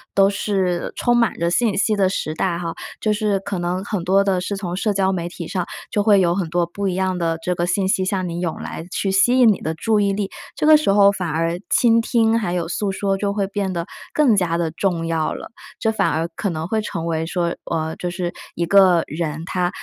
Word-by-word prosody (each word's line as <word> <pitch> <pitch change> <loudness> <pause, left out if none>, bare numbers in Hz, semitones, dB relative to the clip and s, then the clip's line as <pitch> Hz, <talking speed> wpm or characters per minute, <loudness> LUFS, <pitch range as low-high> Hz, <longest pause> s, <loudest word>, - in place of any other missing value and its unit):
都 195 0 +5
是 190 -4 -1
充 240 -1 +2
满 235 -2 +2
着 170 +1 0
信 215 +1 +1
息 210 +2 +2
的 190 -2 +2
时 155 -5 -3
代 170 +1 -1
哈， 170 -1 -4 0.3
就 215 - +1
是 210 -2 0
可 190 -1 -4
能 180 +2 -2
很 205 -4 -3
多 195 +3 +3
的 190 -2 +1
是 200 +2 -3
从 180 -3 -4
社 205 +2 0
交 190 -1 +1
媒 175 -2 -3
体 170 -2 -7
上 180 -2 -2 0.3
就 205 - +1
会 205 -1 +5
有 175 -2 +3
很 180 -4 -2
多 175 +1 +1
不 195 +4 -4
一 180 - -1
样 185 -1 0
的 165 -1 0
这 180 - 0
个 175 0 -1
信 190 +1 +1
息 190 -1 +1
向 185 -1 -1
你 170 0 -4
涌 170 -3 -2
来， - - -6
去 195 - -1
吸 240 +7 +4
引 245 - +7
你 - - -8
的 160 - -2
注 215 +6 +1
意 200 -1 +2
力。 195 0 -2 0.2
这 - - -1
个 310 0 +8
时 305 -5 +2
候 200 0 +6
反 180 -4 -3
而 165 +2 -1
倾 230 -1 +4
听 230 -1 +2
还 175 -6 -2
有 170 -2 -1
诉 200 +2 -1
说 195 0 -1
就 200 +1 -1
会 200 -1 -1
变 200 -1 -2
得 170 0 -3 0.3
更 275 -8 +3
加 170 -3 +1
的 165 -2 -1
重 170 -1 -1
要 165 -1 -1
了， - - -9 0.3
这 220 - +1
反 215 - +1
而 160 +2 -1
可 200 - -2
能 160 0 -4
会 220 +2 0
成 170 -5 -4
为 160 -1 -1
说， 170 0 -1
呃， 160 -1 -2
就 180 - -3
是 175 0 -3 0.2
一 170 - 0
个 185 -2 +5
人 155 0 -4
他 180 -1 0
185 Hz, 265 characters per minute, -21 LUFS, 170-200 Hz, 0.3 s, 个